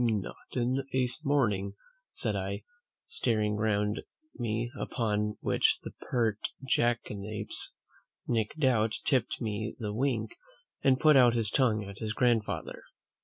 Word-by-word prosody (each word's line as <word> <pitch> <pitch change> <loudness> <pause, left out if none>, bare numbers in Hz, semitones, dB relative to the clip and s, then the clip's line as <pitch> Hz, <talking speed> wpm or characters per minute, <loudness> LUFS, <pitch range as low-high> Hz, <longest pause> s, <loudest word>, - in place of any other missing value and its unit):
"Not 110 -5 0 0.2
in 125 +2 +1
a 130 -1 +3 0.2
morning!" 105 -9 +1 0.4
said - - -1
I, - - -3 0.4
staring 110 -3 0
round 105 0 +1 0.3
me; 120 -1 -2
upon 105 -4 -1
which - - +3
the - - -6 0.2
pert 115 -4 +1 0.3
jackanapes, 110 -4 0 0.5
Nic 115 0 0
Doubt, 115 -7 +2
tipped 130 -4 +2
me 110 -1 -3
the 105 -4 -3
wink, 135 - -1 0.5
and 130 -1 +4
put 155 -1 +6
out 120 -3 +6
his 110 -3 +1
tongue 115 -6 +2
at 100 0 -9
his 110 -1 -2
grandfather. 120 -3 0
115 Hz, 125 wpm, -30 LUFS, 105-125 Hz, 0.5 s, put